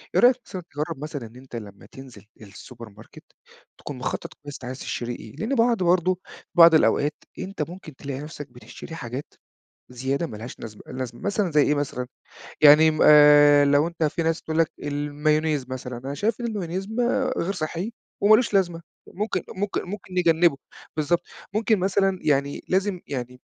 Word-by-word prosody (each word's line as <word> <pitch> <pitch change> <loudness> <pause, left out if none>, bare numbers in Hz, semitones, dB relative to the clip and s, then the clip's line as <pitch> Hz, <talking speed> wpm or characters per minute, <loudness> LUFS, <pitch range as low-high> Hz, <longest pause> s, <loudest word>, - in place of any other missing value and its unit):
إيه - - +5
رأيك 245 +1 +7
مثلًآ 185 - -7
تجرّب 145 0 -4
مثلًا 145 -5 -5
إن 110 - -18
أنت 130 -1 -12
لمّا 100 -4 -9
تنزل 130 -6 -13 0.2
الSupermarket، 110 +1 -13 0.6
تكون - - -8
مخطط - - -4
كويس 145 -1 -8
أنت 125 - -9
عايز 130 +2 -6
تشتري 120 -3 -4
إيه، 110 - -12
لأن 220 - -2
بعض 230 -4 +2
برضه، 180 +1 +2 0.4
بعض 165 -1 +8
الأوقات 150 -1 +3 0.3
أنت 185 -5 -4
ممكن 175 -5 -10
تلاقي 135 0 -6
نفسك 150 -1 -8
بتشتري 125 +6 -11
حاجات 130 -1 -7 0.6
زيادة 135 +6 -2
ما 110 - -8
لهاش 115 +4 -9
نزمة 110 -2 -9
لازمة 125 -2 -6
مثلًا 205 -2 0
زي 150 -1 +4
إيه 150 - +2
مثلًا 140 -3 -3 0.5
يعني 155 +1 +8
م 155 - -3
آآ 145 -1 +8
لو 145 +2 +3
أنت 170 -1 -3
في 155 +2 0
ناس 165 0 0
تقول 160 0 -3
لك 165 - +2
المايونيز 150 0 0
مثلًا 130 -1 -6
أنا 135 +3 -6
شايف 220 +8 -1
إن 240 - -2
المايونيز 195 -3 -4
ما 245 +3 0
غير 180 +4 -1
صحّي 175 +4 -4 0.3
وما 210 +2 +7
لوش 235 -2 -1
لازمة 175 -4 +1 0.3
ممكن 210 +4 -2
ممكن 205 +1 -2
ممكن 190 0 -8
نجنبه 170 -3 +3 0.4
بالضبط 160 +3 +1 0.3
ممكن 215 0 +2
مثلًا 195 0 +1
يعني 140 -1 0
لازم 190 0 0
يعني 125 -2 -6
155 Hz, 175 wpm, -24 LUFS, 135-185 Hz, 0.6 s, بعض